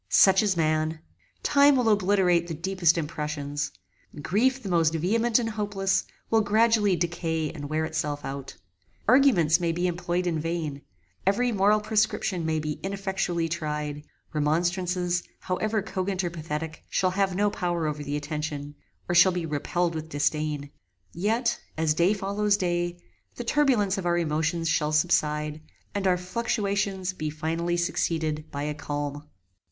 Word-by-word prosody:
Such 190 -1 +6
is 200 -4 +1
man. 155 0 +1 0.5
Time 285 0 +5
will 250 -3 +2
obliterate 190 -4 +3
the 165 - -4
deepest 175 0 +2
impressions. 150 -2 -3 0.5
Grief 255 - +1
the - - -5
most 165 -3 +2
vehement 225 +8 +2
and 230 -2 -1
hopeless, 205 -2 0 0.3
will 225 -1 +5
gradually 215 -1 +3
decay 165 -2 -1
and 145 -3 -7
wear 155 +1 0
itself 150 -2 -3
out. 135 0 -6 0.5
Arguments 215 - +5
may 170 -1 0
be 175 +2 -1
employed 175 0 -1
in 165 -3 0
vain: 155 -3 -3 0.5
every 245 +5 +2
moral 210 0 +3
prescription 210 -5 0
may 160 0 +1
be 155 -1 -3
ineffectually 190 -3 -1
tried: 150 -3 -3 0.3
remonstrances, 175 +3 0 0.2
however 215 +3 -1
cogent 190 -2 -2
or 175 - -2
pathetic, 160 -1 -5
shall 185 -1 +1
have 195 -1 0
no 205 +2 +2
power 175 -4 -1
over 150 -1 -2
the 145 +1 -2
attention, 150 -1 -4 0.3
or 175 - 0
shall 175 +2 +7
be 175 -2 -2
repelled 165 +3 -1
with 160 0 -5
disdain; 150 -1 -1 0.4
yet, 225 +7 0 0.2
as 160 -1 +2
day 175 +6 +3
follows 200 +1 +1
day, 175 -1 -1 0.4
the 245 - -5
turbulence 230 -8 +2
of 180 - -3
our 175 0 +2
emotions 165 +1 0
shall 155 -2 +1
subside, 150 -1 +1 0.3
and 200 -1 0
our 180 -1 +3
fluctuations 195 -1 -1
be 155 -4 -3
finally 165 +3 -2
succeeded 160 -3 -1
by 140 0 -4
a 150 0 -2
calm. 145 -1 -4
175 Hz, 150 wpm, -26 LUFS, 155-195 Hz, 0.5 s, shall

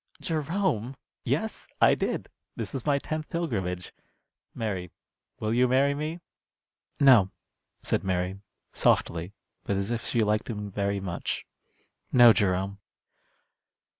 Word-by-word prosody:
"Jerome!" 155 - -1 0.3
"Yes, - - -2
I - - +6
did. - - -2 0.3
This - - -5
is 135 +1 -4
my 145 -1 +4
tenth 155 +2 -4
pilgrimage. 95 - -3 0.6
Mary, 95 -6 -3 0.5
will 110 +1 -1
you 125 +2 +4
marry 135 +3 +3
me?" 155 +4 -4 0.8
"No," 120 -9 +7 0.5
said - - 0
Mary, 95 +1 -1 0.3
softly, 85 +3 +2 0.3
but 100 - -1
as 100 +3 -2
if 115 -1 -2
she 120 - +1
liked 105 +2 +1
him 105 -3 -4
very 100 0 -1
much. 90 -3 -3 0.7
"No, 120 -2 +8
Jerome." 95 0 0
110 Hz, 120 wpm, -27 LUFS, 95-140 Hz, 0.8 s, No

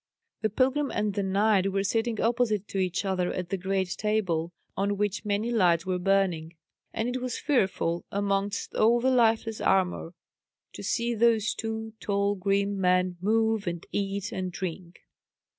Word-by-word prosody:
The 215 - +1
pilgrim 265 +6 +1
and 210 -1 -1
the 200 - -1
knight 195 0 +2
were 195 0 0
sitting 225 +2 0
opposite 225 -3 +1
to 195 - -2
each 185 +1 -1
other 185 -2 0
at 180 -2 -4
the 195 - 0
great 190 0 -1
table, 180 -6 -1 0.2
on 200 +1 0
which 205 +1 -1
many 210 +3 0
lights 180 -6 +3
were 185 -1 -1
burning; 180 -4 +1 0.4
and 220 +1 -2
it 250 +1 -2
was 250 -2 -3
fearful, 190 - 0
amongst 200 +1 -1
all 230 +2 +4
the 260 +2 +2
lifeless 225 -3 +2
armour, 180 -2 +1 0.6
to - - -8
see 235 0 0
those 230 -1 +3
two 220 0 -4
tall 200 0 0
grim 200 +1 0
men 180 -1 +2
move, 220 0 +1
and 170 -1 -3
eat, 200 0 -2
and 185 -1 -3
drink. 175 -1 -6
200 Hz, 160 wpm, -27 LUFS, 185-220 Hz, 0.6 s, all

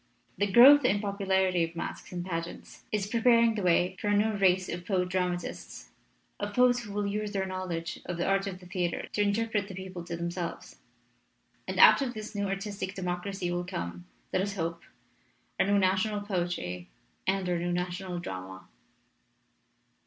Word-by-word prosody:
The 205 - +1
growth 270 +6 +9
in 205 -5 +3
popu 200 -1 -4
larity 185 -3 +2
of 165 - -19
masques 170 - -6
and 175 -1 -4
pageants 170 -2 -6
is 210 -2 0
preparing 230 +1 +4
the 215 - -3
way 180 0 +2
for - - -2
a 205 0 +3
new 215 +2 +3
race 190 -3 +2
of 175 0 -5
poet 180 -1 0
dramatists, 180 -1 -3 0.5
of 205 0 -4
poets 250 -1 +5
who 220 -4 -8
will 205 0 -1
use 210 +1 -2
their 195 -1 0
knowledge 185 -3 -4
of 175 -1 -3
the 175 - -1
art 195 0 +1
of 190 -2 -5
the 180 - -14
theater 175 -1 -2
to 210 - +1
interpret 205 0 0
the 190 - -8
people 185 -2 -7
to 170 -1 -5
themselves. 170 0 -5 0.9
And - - -3
out - - +8
of 250 -3 -2
this 215 0 -7
new 200 -1 -1
artistic 195 0 -4
democracy 180 0 -3
will 175 0 -1
come, 85 - -5 0.3
let - - +2
us 200 +1 -2
hope, 170 -2 -3 0.8
our - - +3
new 200 0 +3
national 200 +2 +1
poetry 175 - -3 0.4
and 190 -1 +1
our 175 -1 0
new 175 +1 -1
national 180 +1 -3
drama." 95 - -7
190 Hz, 180 wpm, -29 LUFS, 175-205 Hz, 0.9 s, growth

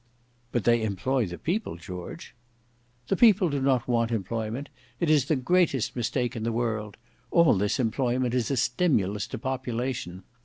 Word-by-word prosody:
"But 120 - 0
they 120 -1 +3
employ 110 +4 0
the 85 0 -7
people, 190 - -2
George." 90 +1 -8 0.8
"The 195 - +3
people 200 -5 +5
do 140 -1 -1
not 130 -3 +2
want 115 -2 +1
employment; 115 +4 -3 0.3
it 165 -2 +2
is 145 -4 +4
the 155 - +1
greatest 145 -2 +1
mistake 120 +1 -1
in 115 - -4
the 115 +1 -1
world; 110 -3 -2 0.3
all 170 -2 +5
this 100 +3 0
employment 125 +1 0
is 125 -2 0
a 135 - 0
stimulus 115 - +1
to - - -5
population. 125 -6 -3
120 Hz, 160 wpm, -27 LUFS, 110-135 Hz, 0.8 s, people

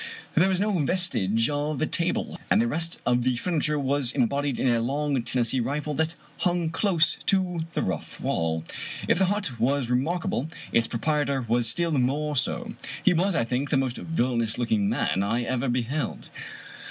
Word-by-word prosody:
There 180 +4 +4
was 185 -1 +1
no 210 +2 +1
vestige 125 - +1
of 145 -1 -2
a 155 - +2
table, 170 +2 -1
and - - +4
the 230 - +3
rest 165 -5 -1
of 125 0 +3
the 125 0 +1
furniture 150 +2 0
was 140 -2 +2
embodied 140 +1 0
in - - +1
a 120 -2 +3
long 140 +2 0
Tennessee 120 +1 +1
rifle 145 +5 -2
that 160 +2 0 0.2
hung 175 -3 0
close 170 -2 +2
to 185 -3 +2
the - - 0
rough 90 -4 -4
wall. 80 -1 -1 0.4
If - - +3
the 190 - +5
hut 190 - -2
was 130 +1 +1
remarkable, 155 +3 0 0.2
its 115 0 +3
proprietor 140 +1 0
was 120 0 +2
still 170 +7 +1
more 145 +2 0
so. 130 - -1 0.3
He - - +5
was, 180 +2 +1
I - - +2
think, 125 +4 -2
the 145 - +2
most 130 -2 -1
villainous 120 -7 -1
looking 110 -4 +1
man 105 -4 0
I 115 +5 0
ever 130 +1 -1
beheld. 125 +5 -2
140 Hz, 175 wpm, -26 LUFS, 120-165 Hz, 0.4 s, the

